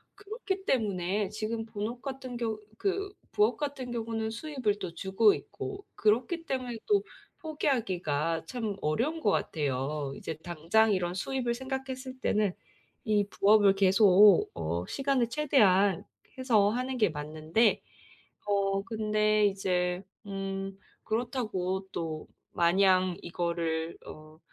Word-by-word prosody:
그렇기 405 -2 -5
때문에 200 -4 0
지금 220 +2 -3
본업 220 +4 -5
같은 260 -3 -6
경우 225 -2 -2 0.2
그 395 0 -1 0.2
부업 220 +2 +3
같은 280 -4 -4
경우는 225 -1 -2
수입을 230 -5 -2
또 175 -3 -6
주고 195 +4 +3
있고 400 0 -7
그렇기 250 +11 +1
때문에 250 -4 -3
또 410 -2 +3 0.4
포기하기가 175 - -1
참 220 -3 -3
어려운 240 - 0
것 295 - +1
같아요. 140 -4 -1
이제 160 - -5
당장 175 +7 +2
이런 180 -2 0
수입을 245 +5 -1
생각했을 260 0 -5
때는 210 -5 +1 0.5
이 210 -4 +1
부업을 205 -1 +5
계속 195 0 +6
어 85 +2 -2
시간을 270 -4 0
최대한 205 - +3 0.4
해서 220 -6 +4
하는 255 +3 -2
게 210 -6 +3
맞는데 155 +8 0 0.6
어 195 -1 +1
근데 215 -1 +1
이제 180 -2 0 0.2
음 195 0 -4 0.3
그렇다고 215 -5 -2
또 160 -2 -4 0.2
마냥 185 +1 +3
이거를 170 -1 -2
어 155 0 -12
210 Hz, 250 characters per minute, -29 LUFS, 180-245 Hz, 0.6 s, 계속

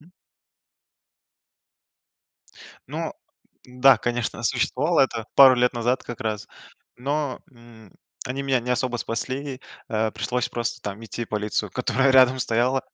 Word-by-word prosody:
Мгм. 165 +4 -20 2.8
Ну - - -4 0.5
да, 125 +2 +5
конечно, 120 -3 -3
существовал, 135 +6 0
это 115 -4 0
пару 135 -2 +9
лет 125 0 +2
назад 120 +2 0
как 120 - -8
раз, 105 -2 -3 0.5
но, 140 +1 -2
м, 115 -4 -17 0.3
они 130 +2 -3
меня 135 -2 +1
не 125 +1 -5
особо 125 0 0
спасли, 130 +4 -4 0.3
э, 110 0 0
пришлось 125 0 -2
просто 120 -1 -3
там 105 +2 -6
идти 120 +1 -5
в - - -21
полицию, 105 0 -2
которая 135 +1 +1
рядом 130 0 +5
стояла. 125 +2 +1
125 Hz, 130 wpm, -24 LUFS, 115-130 Hz, 2.8 s, пару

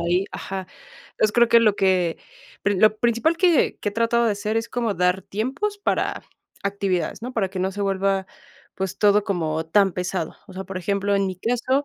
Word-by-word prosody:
ahí 175 +3 +1
ajá. 190 -1 -5 0.5
Entonces, 215 -1 +1
creo 235 -1 +4
que 235 0 +6
lo 215 -3 +4
que 185 -3 +2 0.5
pri 200 -2 +1
lo 215 +1 +5
principal 240 +8 +2
que 345 -3 +3
que 205 - -1
he - - -14
tratado 230 +1 +2
de 220 - +2
hacer 210 +2 -2
es 225 +1 -1
como 235 -4 -1
dar 180 +1 +1
tiempos 275 - -3
para - - -1 0.4
actividades, 200 -2 -1
¿no?, 250 +2 -5
para 210 -6 0
que 190 - -6
no 190 +1 -1
se 205 - -6
vuelva, 195 -1 0 0.5
pues, 190 -1 -4
todo 205 0 +4
como 160 -4 -2
tan 195 +2 +3
pesado. 180 -2 -3
O - - -13
sea, 190 +1 -6
por 190 - -7
ejemplo, 200 +2 0
en 195 0 +1
mi 185 -1 -4
caso, 245 +7 0
200 Hz, 205 wpm, -23 LUFS, 190-230 Hz, 0.5 s, que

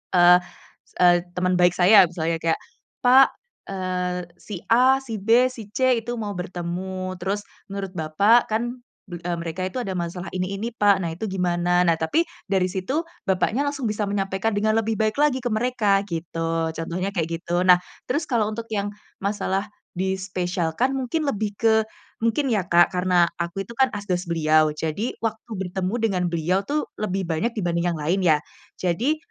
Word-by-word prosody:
eee 175 0 +8 0.6
eee, 175 -1 +7 0.2
teman 180 0 +1
baik 180 0 +5
saya 195 +3 +8
misalnya 165 -1 -1
kayak, 165 -1 +1 0.4
Pak, 260 +2 +7 0.4
eee, 180 -2 -2
si 200 -2 -8
A, 255 +3 +5
si 255 -5 -6
B, 230 +5 +5
si 230 -5 -9
C, 260 +2 +3
itu 240 - -4
mau 205 -2 -3
bertemu 185 +1 -4
terus 190 +3 -2 0.3
menurut 195 -1 -5
Bapak 200 +10 +3
kan 240 +3 -2 0.2
be 175 - -7
eee, 175 0 -2
mereka 170 +2 -5
itu 185 +7 -4
ada 195 -5 -4
masalah 175 +1 -4
ini 185 +1 -2
ini 230 +3 -2
pak 205 -3 +4
nah 170 - -2
itu 175 - -8
gimana? 175 -1 +1
Nah 165 - +4
tapi 165 - +1 0.3
dari 190 -2 +3
situ 190 +6 -3 0.3
bapaknya 195 +8 +1
langsung 285 -4 -2
bisa 210 0 -2
menyampaikan 195 +1 -1
dengan 215 +1 +1
lebih 225 0 0
baik 215 0 +1
lagi 290 -3 +3
ke 245 - -2
mereka 215 -3 +1
gitu 165 -2 -2
contohnya 175 +4 -2
kayak 165 -3 +1 0.2
gitu 175 +1 0
nah 180 -1 +7 0.3
terus 295 +5 -1
kalau 235 -5 +2
untuk 225 +1 -6
yang 205 -2 -2 0.3
masalah 200 -1 -1 0.3
dispesialkan 185 +3 -1
mungkin 270 +4 -1
lebih 210 -6 -2
ke, 220 -1 +4 0.4
mungkin 230 +5 +1
ya 210 - +2
Kak 175 +2 +5
karena 180 -1 +3 0.2
aku 170 +3 -3
itu 235 - -10
kan 265 +2 +3
asdos 185 -3 -3
beliau 155 -1 +3
jadi 160 +9 -3
waktu 225 0 -4
bertemu 185 +1 -3
dengan 205 -6 0
beliau 170 +3 0
tuh 295 +9 -2 0.2
lebih 195 -2 -1
banyak 170 +8 -1
dibanding 175 -3 0
yang 170 - -2
lain 165 +6 0
ya 160 -4 +4 0.4
jadi, 225 - 0
190 Hz, 170 wpm, -23 LUFS, 175-220 Hz, 0.6 s, eee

